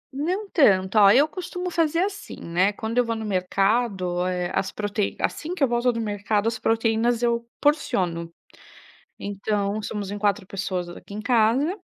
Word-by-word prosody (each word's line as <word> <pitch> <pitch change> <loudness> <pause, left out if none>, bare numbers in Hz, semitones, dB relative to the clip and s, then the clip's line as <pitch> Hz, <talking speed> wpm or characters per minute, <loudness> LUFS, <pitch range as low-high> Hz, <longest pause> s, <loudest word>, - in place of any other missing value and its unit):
Não 365 +9 -2
tanto. 195 - +3
Ó, 200 -1 +8
eu 270 +9 +6
costumo 360 +1 -5
fazer 330 0 +1
assim, 400 +1 -4
né. 180 +4 +1
Quando 225 +4 -2
eu - - +5
vou 230 0 -2
no 220 0 -5
mercado, 195 -1 0
eh, 180 -1 -2
as 190 - -1
proteí 205 -1 -2
assim 335 +3 -2
que 315 - 0
eu 275 - +5
volto 240 +1 +2
do 230 - -4
mercado, 205 0 -1
as 230 - -1
proteínas, 225 +1 +1
eu 235 -1 +1 0.2
porciono. 180 - 0 0.9
Então 205 +1 -2
somos 205 -2 -4
em 205 - -4
4 200 -2 0
pessoas 185 -2 -3
aqui 175 +3 -11
em 210 - -5
casa. 245 - +2
215 Hz, 170 wpm, -24 LUFS, 195-245 Hz, 0.9 s, Ó